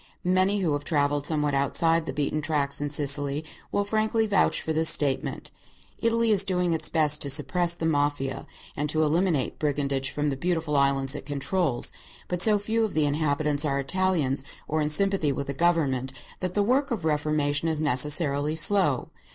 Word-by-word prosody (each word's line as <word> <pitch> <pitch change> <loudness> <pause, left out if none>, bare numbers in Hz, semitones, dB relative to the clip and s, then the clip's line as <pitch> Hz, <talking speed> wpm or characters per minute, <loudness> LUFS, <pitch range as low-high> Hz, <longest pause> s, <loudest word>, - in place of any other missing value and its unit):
Many 185 +3 +2
who 165 -5 0
have 145 0 -3
travelled 145 -1 0
somewhat 150 -2 0
outside 165 +4 +1
the - - -2
beaten 150 +1 -2
tracks 145 -2 0
in 145 - -2
Sicily 145 +1 +1 0.3
will 205 - 0
frankly 220 +2 0
vouch 205 -2 +2
for 160 - -3
this 160 +1 +3
statement. 140 -3 -1 0.5
Italy 230 0 +1
is 200 -2 +4
doing 180 -3 0
its 160 - 0
best 150 -2 +2
to 140 - +2
suppress 170 +5 +2
the 165 - -4
Mafia 145 -3 -1 0.3
and 150 +1 -2
to 155 +1 +1
eliminate 155 -2 0
brigandage 140 -2 -1
from 150 0 -2
the - - -3
beautiful 160 0 -2
islands 135 -1 +2
it 145 - -8
controls, 145 -1 0 0.3
but 180 -1 -3
so 210 +1 +4
few 220 +3 -1
of 220 - -3
the 155 -1 +2
inhabitants 145 0 0
are 140 -2 0
Italians 150 -3 0 0.2
or 155 0 -1
in 150 - 0
sympathy 195 -2 +1
with 140 +1 -4
the 140 - -4
government 140 -5 0 0.3
that 185 -1 -4
the 205 - +2
work 265 +6 +1
of 215 - -3
reformation 150 0 0
is 160 -2 -1
necessarily 145 +1 +1
slow. 160 -5 +2
150 Hz, 180 wpm, -25 LUFS, 145-180 Hz, 0.5 s, is